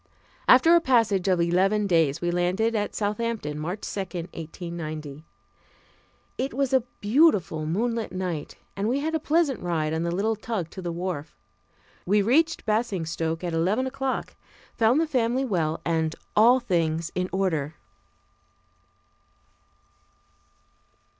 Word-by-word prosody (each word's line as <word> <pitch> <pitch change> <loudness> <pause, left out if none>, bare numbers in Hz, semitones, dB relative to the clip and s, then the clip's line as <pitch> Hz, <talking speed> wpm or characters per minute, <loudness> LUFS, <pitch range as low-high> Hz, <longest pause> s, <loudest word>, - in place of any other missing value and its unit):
After 295 +7 +7
a 340 - +5
passage 225 - +2
of 185 -2 +3
eleven 190 +5 +2
days 165 -7 +2
we 175 0 0
landed 180 +6 +1
at 210 -2 -2
Southampton, 210 -7 -2
March 175 +7 -4
2, - - -5
1890. 165 -4 -6 1.2
It 265 -1 -2
was 275 -1 0
a 260 - +5 0.2
beautiful 205 - +3
moonlight 225 +6 -1
night 180 -5 -4 0.2
and 200 +3 -1
we 270 +3 0
had 320 +2 -2
a 320 - +1
pleasant 310 -3 +1
ride 160 -3 -1
on 160 - -1
the 170 - -1
little 205 +6 0
tug 215 -6 -4
to 190 - -8
the 175 -1 -3
wharf. 170 -3 -5 0.7
We 205 +2 +3
reached 320 +9 +2
Basingstoke 170 -7 -1
at 175 -2 -2
eleven 190 +10 +1
o'clock, 265 0 -3 0.4
found 230 +5 +3
the 330 - +2
family 255 -2 0
well 165 -9 -1
and 160 -1 0 0.2
all 240 +4 +6
things 170 -7 -1
in 185 0 -2
order. 165 -6 -1
190 Hz, 135 wpm, -25 LUFS, 165-235 Hz, 1.2 s, After